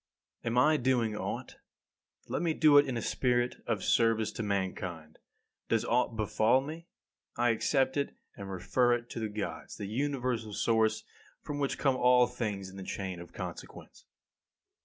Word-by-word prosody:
23. 115 - -2
Am 120 - -1
I 150 +4 +5
doing 120 -5 +1
aught? - - -5 0.7
Let - - -2
me 165 -2 0
do 150 -2 +7
it 145 - +3
in 125 -3 -2
a 115 - -3
spirit 125 -1 +1
of - - -1
service 115 -1 +2
to - - -5
mankind. 95 -6 -3 0.5
Does - - +1
aught 125 -2 +1
befall 110 +3 +3
me? 160 +5 -7 0.5
I 120 +1 +3
accept 130 +4 +1
it 140 - -1 0.2
and 100 -1 -8
refer 120 +7 +2
it 120 0 -7
to - - -5
the 110 -1 -2
Gods, 105 0 -5
the 100 - -5
universal 125 -2 -2
source 110 0 +2 0.4
from 145 -1 -4
which 140 -1 -1
come 135 -3 +2
all 125 0 +5
things 110 -6 -4
in 95 +1 -11
the 95 - -6
chain 95 -1 -4
of 85 - -11
consequence. - - -9
120 Hz, 170 wpm, -31 LUFS, 105-130 Hz, 0.7 s, do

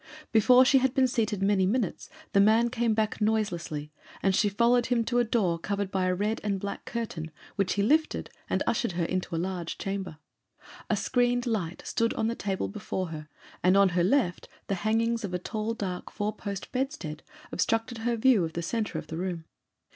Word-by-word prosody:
Before 250 +4 +6
she 270 +1 +5
had 260 +1 +1
been 265 -2 +5
seated 215 -5 -1
many 195 -2 +3
minutes 220 -1 -1 0.2
the 200 - +5
man 220 +4 +5
came 235 -3 +1
back 215 0 -1
noiselessly, 175 -9 -1 0.3
and 195 -1 +3
she 205 - +3
followed 235 +4 +3
him 235 -2 +2
to 245 +1 +1
a - - +4
door 200 -8 +1
covered 200 +2 -2
by 185 -1 +1
a 185 - +1
red 210 +4 -1
and 200 -2 -1
black 200 +1 -5
curtain, 195 -9 -4 0.3
which 195 -3 +1
he 200 - +1
lifted, 310 +8 +1 0.2
and - - +1
ushered 235 -7 0
her 170 -1 0
into 185 -1 -2
a - - 0
large 175 -1 -3
chamber. 195 -5 -4 0.7
A - - +3
screened 245 -1 +1
light 190 -8 -2
stood 230 0 0
on 220 +1 0
a - - -4
table 190 - -2
before 180 - -4
her, 155 -1 -7 0.3
and 185 +2 +4
on 200 -1 +6
her 175 -1 +1
left 190 -3 +1 0.2
the - - -2
hangings 230 +2 +1
of 185 -3 -3
a - - +2
tall 215 +5 -3
dark 185 -4 -4
four 210 0 -2
post 200 -2 -6
bedstead 255 - -3 0.3
obstructed 225 +4 0
her 235 +1 0
view 225 -4 +4
of 160 -1 -3
the 170 - -3
centre 220 +5 -2
of - - -5
the 160 - -6
room. 175 -2 -3
205 Hz, 200 wpm, -28 LUFS, 185-230 Hz, 0.7 s, Before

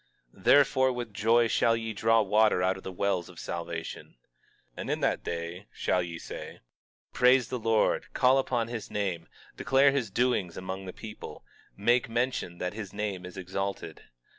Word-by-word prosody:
22:3 - - -18
Therefore, 130 -2 +5
with 120 -3 -5
joy 115 +3 +3
shall 115 0 +2
ye 115 -1 -4
draw 115 +1 +3
water 105 -2 +3
out 95 +1 +2
of 95 - -10
the 95 - -6
wells 95 -2 -1
of - - -12
salvation. 85 -1 -6 0.6
22:4 - - -37
And - - -5
in - - 0
that - - 0
day 85 +3 -5
shall 90 - 0
ye 85 -1 -5
say: - - -8 0.5
Praise 125 -1 +4
the 125 - -3
Lord, 115 -1 +1
call 130 +2 +4
upon 120 -3 0
his 115 -2 -6
name, 95 -5 -2 0.3
declare 135 +1 +4
his 135 -6 -1
doings 100 -5 0
among 95 +1 -5
the 95 - -6
people, 110 +3 -10 0.3
make 120 +4 +2
mention 120 -7 -1
that 90 +2 -3
his 105 -3 -7
name 95 -4 -3
is 90 - -11
exalted. 95 +2 -4
105 Hz, 175 wpm, -28 LUFS, 95-120 Hz, 0.6 s, Therefore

